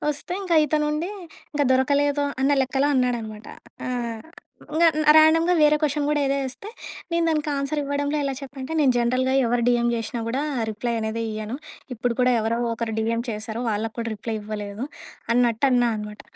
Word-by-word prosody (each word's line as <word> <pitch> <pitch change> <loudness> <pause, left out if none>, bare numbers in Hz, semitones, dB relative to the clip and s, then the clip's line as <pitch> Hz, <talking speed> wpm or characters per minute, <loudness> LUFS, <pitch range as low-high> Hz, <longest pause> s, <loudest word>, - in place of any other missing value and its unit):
వస్తే 300 +5 -3 0.3
ఇతనుండి 300 +2 0 0.4
"ఇంక 290 -1 +1
దొరకలేదు" 285 +2 +2 0.2
అన్న 275 +2 +3
లెక్కలో 270 +2 +1
అన్నాడనమాట. 235 -4 -1 0.4
ఆ! - - -3 0.9
ఇంకా 335 +2 +5 0.3
ర్యాండమ్‌గా 325 +3 +5
వేరే 300 0 +6
క్వశ్చన్ 295 -1 +1
కూడా 300 -1 +1
ఏదో 275 +1 +1
వేస్తే 265 +10 -6 0.4
నేను 335 0 +2
దానికి 305 -1 0
ఆన్స్‌ర్ 280 +2 -1
ఇవ్వడంలో 285 +1 -1
ఎలా 275 -1 -1
చెప్పానంటే, 270 +2 -6
నేను 275 -4 +4
జనరల్‌గా 255 +2 +1
ఎవరు 235 0 +1
డీఎం 240 -1 +3
చేషినా 230 +1 -4
కూడా 260 +5 -1 0.3
రిప్లై 235 +3 -2
అనేది 220 +1 -2
ఇయ్యను. 215 +3 -4 0.4
ఇప్పుడు 235 +1 -2
కూడా 250 0 +4
ఎవరో 230 +2 0 0.2
ఒకరు 225 -1 -3
డీఎం 230 +1 0
చేశారు. 220 +2 -4
వాళ్ళకి 220 +1 -2
కూడా 230 0 -3
రిప్లై 220 +2 -4
ఇవ్వలేదు. 210 +1 -5 0.5
అన్నట్టు 240 +1 +3
అన్నా 245 -1 +3
అనమాట. 210 0 -8
255 Hz, 160 wpm, -24 LUFS, 230-290 Hz, 0.9 s, వేరే